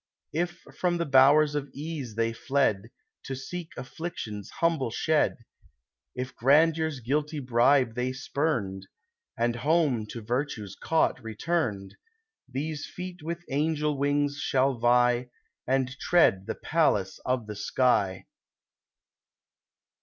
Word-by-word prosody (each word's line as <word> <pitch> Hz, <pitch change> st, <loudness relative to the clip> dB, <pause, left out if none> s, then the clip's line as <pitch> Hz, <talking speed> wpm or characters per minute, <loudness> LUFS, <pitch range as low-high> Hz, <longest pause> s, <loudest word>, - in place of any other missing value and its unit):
If 175 Hz, +2 st, -2 dB, 0.2 s
from 175 Hz, -1 st, +1 dB
the 170 Hz, -, -1 dB
bowers 145 Hz, +2 st, +5 dB
of 145 Hz, -1 st, -3 dB
Ease 145 Hz, -6 st, -5 dB
they 115 Hz, 0 st, 0 dB
fled, 115 Hz, -6 st, 0 dB, 0.4 s
To 135 Hz, -, -4 dB
seek 165 Hz, +5 st, -6 dB
Affliction's 125 Hz, -, -6 dB
humble 165 Hz, -8 st, 0 dB
shed; 150 Hz, -2 st, 0 dB, 0.7 s
If 125 Hz, +1 st, -5 dB
Grandeur's 155 Hz, +2 st, +3 dB
guilty 150 Hz, +5 st, -1 dB
bribe 125 Hz, -1 st, +3 dB
they 125 Hz, +2 st, -1 dB
spurned, 130 Hz, -8 st, -2 dB, 0.5 s
And 120 Hz, 0 st, 0 dB
home 145 Hz, -6 st, +1 dB
to 115 Hz, -, -7 dB
Virtue's 120 Hz, -4 st, -3 dB
cot 160 Hz, -5 st, +1 dB
returned, 110 Hz, -, -2 dB, 0.3 s
— 445 Hz, -, -41 dB
These 150 Hz, +1 st, -3 dB
feet 180 Hz, -1 st, -8 dB
with 170 Hz, +2 st, -5 dB
angel 150 Hz, +1 st, 0 dB
wings 145 Hz, +1 st, 0 dB
shall 135 Hz, +1 st, +2 dB
vie, 120 Hz, +1 st, +3 dB, 0.4 s
And 130 Hz, 0 st, 0 dB
tread 95 Hz, -, +3 dB
the -, -, -3 dB
palace 105 Hz, -, +1 dB
of 125 Hz, -3 st, -1 dB
the 105 Hz, 0 st, -7 dB
sky 100 Hz, -4 st, +1 dB
135 Hz, 120 wpm, -27 LUFS, 120-155 Hz, 0.7 s, bowers